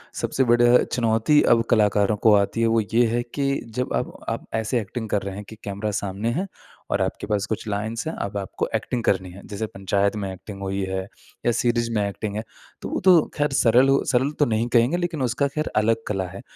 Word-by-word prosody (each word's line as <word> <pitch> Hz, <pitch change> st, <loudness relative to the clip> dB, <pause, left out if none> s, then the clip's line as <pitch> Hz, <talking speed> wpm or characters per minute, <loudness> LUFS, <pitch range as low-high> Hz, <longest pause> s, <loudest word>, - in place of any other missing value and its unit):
सबसे 135 Hz, -, 0 dB
बड़ा 120 Hz, +1 st, +5 dB, 0.2 s
चुनौती 115 Hz, +5 st, +3 dB
अब 115 Hz, -1 st, +5 dB
कलाकारों 105 Hz, -2 st, +3 dB
को 110 Hz, -, +8 dB
आती 100 Hz, +3 st, +1 dB
है 115 Hz, -, +3 dB
वो 115 Hz, 0 st, +3 dB
ये 120 Hz, +1 st, +5 dB
है 120 Hz, +2 st, 0 dB
कि 140 Hz, -, 0 dB, 0.3 s
जब 125 Hz, 0 st, -2 dB
आप 65 Hz, -, -1 dB, 0.2 s
आप -, -, -4 dB
ऐसे 110 Hz, +2 st, 0 dB
एक्टिंग 110 Hz, +2 st, -6 dB
कर 105 Hz, -, +1 dB
रहे 100 Hz, -1 st, -5 dB
हैं 105 Hz, -, -6 dB
कि 110 Hz, -, -9 dB
कैमरा 100 Hz, +1 st, -3 dB
सामने 100 Hz, +2 st, -2 dB
है 185 Hz, +8 st, -2 dB, 0.4 s
और -, -, +1 dB
आपके -, -, -2 dB
पास 105 Hz, -2 st, 0 dB
कुछ 110 Hz, 0 st, -4 dB
लाइन्स 110 Hz, +5 st, -3 dB
है 160 Hz, -, -3 dB
अब 100 Hz, 0 st, -3 dB
आपको 100 Hz, -2 st, -3 dB
एक्टिंग 120 Hz, -2 st, -2 dB
करनी 95 Hz, -2 st, +1 dB
है 95 Hz, +3 st, -12 dB
जैसे 105 Hz, +2 st, -4 dB
पंचायत 100 Hz, +1 st, 0 dB
में 100 Hz, -2 st, -3 dB
एक्टिंग 100 Hz, +2 st, -9 dB
हुई 95 Hz, 0 st, -2 dB
है 95 Hz, 0 st, -1 dB, 0.5 s
या -, -, +5 dB
सीरीज़ 120 Hz, 0 st, +1 dB
में 105 Hz, -1 st, +1 dB
एक्टिंग 100 Hz, +1 st, -5 dB
है 110 Hz, -, -3 dB, 0.4 s
तो -, -, -4 dB
वो -, -, -1 dB
तो 180 Hz, -3 st, +8 dB
ख़ैर 145 Hz, 0 st, 0 dB
सरल 125 Hz, 0 st, +4 dB
हो, 135 Hz, -, +3 dB
सरल 130 Hz, +2 st, +1 dB
तो 145 Hz, -, +5 dB
नहीं 115 Hz, -1 st, 0 dB
कहेंगे 120 Hz, +9 st, +3 dB
लेकिन 175 Hz, -4 st, -2 dB
उसका 130 Hz, +3 st, +1 dB
ख़ैर 155 Hz, +2 st, -3 dB
अलग 110 Hz, +1 st, +2 dB
कला 95 Hz, -3 st, -1 dB
है। 95 Hz, +2 st, -9 dB
110 Hz, 225 wpm, -23 LUFS, 100-120 Hz, 0.5 s, को